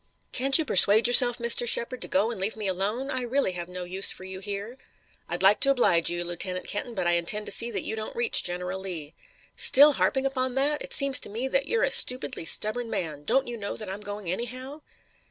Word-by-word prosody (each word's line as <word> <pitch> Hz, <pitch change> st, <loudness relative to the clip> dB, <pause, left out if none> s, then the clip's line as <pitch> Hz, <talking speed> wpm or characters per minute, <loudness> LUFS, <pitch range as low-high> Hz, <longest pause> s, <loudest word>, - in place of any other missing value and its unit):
Can't 270 Hz, +2 st, +3 dB
you 320 Hz, -, -2 dB
persuade 210 Hz, -1 st, +5 dB
yourself, 245 Hz, 0 st, +7 dB
Mr. 235 Hz, 0 st, +1 dB
Shepard, 235 Hz, +2 st, 0 dB
to -, -, -2 dB
go 205 Hz, +5 st, 0 dB
and 210 Hz, -5 st, -7 dB
leave 210 Hz, +3 st, -2 dB
me 215 Hz, -, -6 dB
alone? 210 Hz, +9 st, -3 dB
I 255 Hz, -, -3 dB
really 250 Hz, -3 st, -1 dB
have 175 Hz, -1 st, -7 dB
no 180 Hz, 0 st, -7 dB
use 185 Hz, +2 st, +1 dB
for -, -, -8 dB
you 190 Hz, 0 st, -8 dB
here." 205 Hz, +5 st, -7 dB, 0.5 s
"I'd -, -, -4 dB
like 195 Hz, +2 st, +4 dB
to 275 Hz, -, +1 dB
oblige 190 Hz, -11 st, +2 dB
you, 175 Hz, 0 st, -3 dB
Lieutenant 180 Hz, +1 st, -4 dB
Kenton, 230 Hz, +3 st, -5 dB
but 185 Hz, -3 st, -3 dB
I 175 Hz, -, +1 dB
intend 175 Hz, +5 st, 0 dB
to -, -, -4 dB
see 235 Hz, -, +2 dB
that -, -, -4 dB
you -, -, -4 dB
don't 215 Hz, 0 st, -7 dB
reach 470 Hz, -1 st, +1 dB
General 180 Hz, +1 st, -5 dB
Lee." 170 Hz, -5 st, -6 dB, 0.4 s
"Still 290 Hz, +3 st, +6 dB
harping 265 Hz, 0 st, -1 dB
upon 260 Hz, -2 st, -2 dB
that? 290 Hz, +2 st, 0 dB
It -, -, -5 dB
seems 275 Hz, -2 st, +4 dB
to -, -, -7 dB
me 230 Hz, +6 st, -4 dB
that 270 Hz, +1 st, -1 dB
you're 460 Hz, +1 st, -1 dB
a -, -, 0 dB
stupidly 250 Hz, -9 st, +3 dB
stubborn 225 Hz, +6 st, 0 dB
man. 155 Hz, -8 st, -5 dB
Don't 270 Hz, -, 0 dB
you 240 Hz, -1 st, -7 dB
know 200 Hz, -2 st, -6 dB
that 215 Hz, -4 st, -7 dB
I'm 200 Hz, +2 st, -7 dB
going 205 Hz, -2 st, -8 dB
anyhow?" 255 Hz, +8 st, -7 dB
215 Hz, 230 wpm, -25 LUFS, 185-255 Hz, 0.5 s, yourself